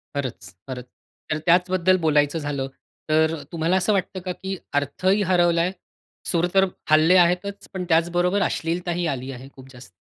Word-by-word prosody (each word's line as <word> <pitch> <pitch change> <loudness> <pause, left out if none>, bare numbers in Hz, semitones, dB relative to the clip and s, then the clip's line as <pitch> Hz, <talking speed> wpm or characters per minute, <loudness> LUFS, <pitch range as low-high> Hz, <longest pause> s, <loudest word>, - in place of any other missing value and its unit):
खरंच, 120 -10 -5
खरंच. 125 -1 -6 0.5
तर 155 - +1
त्याच 180 +1 +4
बद्दल 185 0 +3
बोलायचं 145 +1 +2
झालं. 145 -3 -3 0.4
तर 160 +1 +3 0.2
तुम्हाला 165 +2 0
असं 210 +3 +2
वाटतं 190 0 -2
का, 185 - -2
की 190 +1 -5 0.2
अर्थ 145 +6 -7
ही 200 +2 +4
हरवलाय. 175 0 +3 0.6
सूर 175 +1 +2
तर 195 0 +5 0.3
हलले 155 +4 +6
आहेतच 200 +3 -2
पण 185 -1 -3
त्याचबरोबर 175 +4 +2
अश्लीलता 175 +1 -1
ही 175 - 0
आली 130 +1 -7
आहे 130 +1 -10
खूप 130 0 -14
जास्त? 125 -1 -13
170 Hz, 165 wpm, -23 LUFS, 145-185 Hz, 0.6 s, हलले